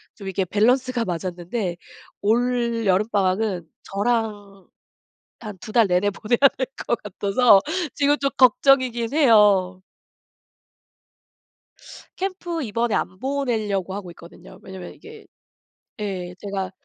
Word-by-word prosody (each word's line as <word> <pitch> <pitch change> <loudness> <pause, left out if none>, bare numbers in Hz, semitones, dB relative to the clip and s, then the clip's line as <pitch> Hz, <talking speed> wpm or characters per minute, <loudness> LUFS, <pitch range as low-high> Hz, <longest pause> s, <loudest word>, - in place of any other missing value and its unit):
좀 200 -3 -10
이렇게 190 0 -1
밸런스가 245 +4 +1
맞았는데 180 +2 -4 0.4
올 235 +1 0
여름방학은 195 -2 0 0.2
저랑 205 -2 -3 0.7
한 210 -4 -8
2 215 - -8
달 230 -4 +5
내내 180 +3 +1
보내야 220 +4 -1 0.2
될 260 - -1 0.2
것 235 - 0
같아서 200 +2 +3 0.3
지금 290 0 +3
좀 275 0 +1
걱정이긴 255 -2 +3
해요. 205 -9 +4 2.4
캠프 360 -4 -4
이번에 230 0 -1
안 185 +1 -2
보내려고 220 -9 -2
하고 195 -3 -7
있거든요. 170 0 -15
왜냐하면 190 -2 -9
이게 440 0 -14 0.7
예 185 -4 -4
제가 195 -2 -4
210 Hz, 235 characters per minute, -22 LUFS, 190-245 Hz, 2.4 s, 달